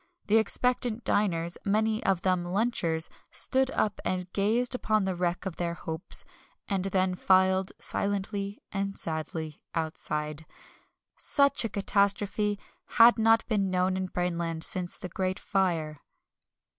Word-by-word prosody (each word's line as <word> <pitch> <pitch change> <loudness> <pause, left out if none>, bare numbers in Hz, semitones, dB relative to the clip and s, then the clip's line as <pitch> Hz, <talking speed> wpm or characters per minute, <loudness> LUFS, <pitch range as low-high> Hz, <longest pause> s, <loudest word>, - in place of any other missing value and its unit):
The 210 +2 +4
expectant 240 +1 0
diners 170 -4 0
(many 215 +2 +1
of 190 -1 +1
them 185 -2 +1
lunchers) 175 -4 0 0.2
stood 265 0 +2
up 210 -6 -1
and 180 -1 -3
gazed 225 +6 +1
upon 215 -5 +1
the 190 - 0
wreck 175 +1 -2
of 190 -3 -5
their 170 -1 -2
hopes, 160 +1 -3 0.4
and 195 -2 -1
then 185 -1 +1
filed, 190 +1 +3
silently 200 0 -2
and 195 0 -3
sadly, 160 -1 -4
outside. 155 -1 -3 0.7
Such 280 -2 +3
a 230 - -1
catastrophe 200 +1 +1 0.4
had 235 0 +8
not 225 +1 +4
been 200 -4 +1
known 185 0 +1
in 190 0 -2
Brainland 170 -2 -2
since 180 0 -1
the - - -6
Great 185 +1 -2
Fire. 165 -6 -1
190 Hz, 130 wpm, -28 LUFS, 175-210 Hz, 0.7 s, had